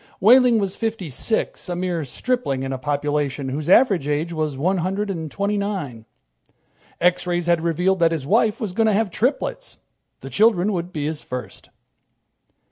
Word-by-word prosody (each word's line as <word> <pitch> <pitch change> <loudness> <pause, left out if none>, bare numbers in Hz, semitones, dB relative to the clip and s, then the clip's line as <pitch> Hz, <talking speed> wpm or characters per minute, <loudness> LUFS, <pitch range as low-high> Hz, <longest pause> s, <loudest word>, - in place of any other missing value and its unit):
Wehling 245 +3 +6
was 195 -3 -1
fifty 220 -8 -3
six, 195 - -2
a 175 - -2
mere 175 -2 -2
stripling 140 - -2
in 135 0 -3
a 130 - -4
population 145 -1 -1
whose 150 +4 -4
average 195 - +4
age 150 +3 -1
was 155 -4 -2
one 185 +7 +1
hundred 195 +4 -2
and 160 -4 -5
twenty 200 +5 -1
nine. 180 - -4 0.9
X 180 +1 +2
rays 175 -1 -1
had 170 -1 +2
revealed 180 +3 +1
that 165 -1 +4
his 155 -5 -3
wife 220 - +2
was 205 -5 -4
going 225 +3 +2
to 215 - +3
have 205 -1 +1
triplets. 300 - -2 0.4
The - - -9
children 210 -2 +3
would 175 0 -3
be 150 -4 -3
his 155 0 -3
first. 125 0 -8
175 Hz, 175 wpm, -22 LUFS, 150-210 Hz, 0.9 s, Wehling